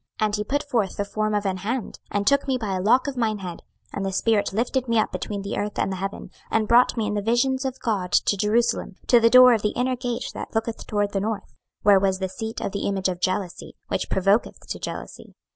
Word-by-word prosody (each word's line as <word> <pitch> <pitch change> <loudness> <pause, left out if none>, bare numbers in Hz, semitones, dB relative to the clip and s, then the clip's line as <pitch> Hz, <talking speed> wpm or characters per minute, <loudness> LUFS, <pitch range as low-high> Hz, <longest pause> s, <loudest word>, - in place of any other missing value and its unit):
26:008:003 215 - +2
And 210 -1 0
he 210 - -1
put 285 +7 -1
forth 235 -9 -1
the 205 - -1
form 215 +1 -1
of 205 0 -1
an 190 -1 0
hand, 225 +5 -4
and 205 0 -1
took 280 +4 +3
me 265 -1 +1
by 215 -5 -3
a 185 - -1
lock 230 +6 +4
of 280 - -3
mine 225 -3 0
head; 180 -4 -7 0.3
and 200 - -3
the 195 - -1
spirit 210 +2 +1
lifted 245 +5 -1
me 230 0 +1
up 215 - +2
between 200 -2 -4
the 200 - -4
earth 210 0 -3
and - - 0
the 190 - -3
heaven, 195 +2 -5 0.2
and 220 -1 +1
brought 240 +2 +4
me 220 - 0
in 210 - -2
the 205 - -1
visions 260 +5 +1
of 265 0 -3
God 200 -6 -2
to - - +3
Jerusalem, 210 0 0
to 240 - +6
the 230 0 +5
door 255 0 +8
of 220 - +1
the 210 - -1
inner 255 +1 0
gate 245 -1 -4
that - - -7
looketh 225 +1 -2
toward 205 -1 0
the 195 - -1
north; 215 0 -4 0.3
where 200 -1 +6
was 190 -1 +1
the 190 0 -3
seat 220 +4 -5
of - - -2
the 200 - -2
image 195 -1 0
of 180 -1 -5
jealousy, 185 -1 -2
which - - -2
provoketh 195 +4 +1
to - - -4
jealousy. - - -7
215 Hz, 255 wpm, -24 LUFS, 200-235 Hz, 0.3 s, door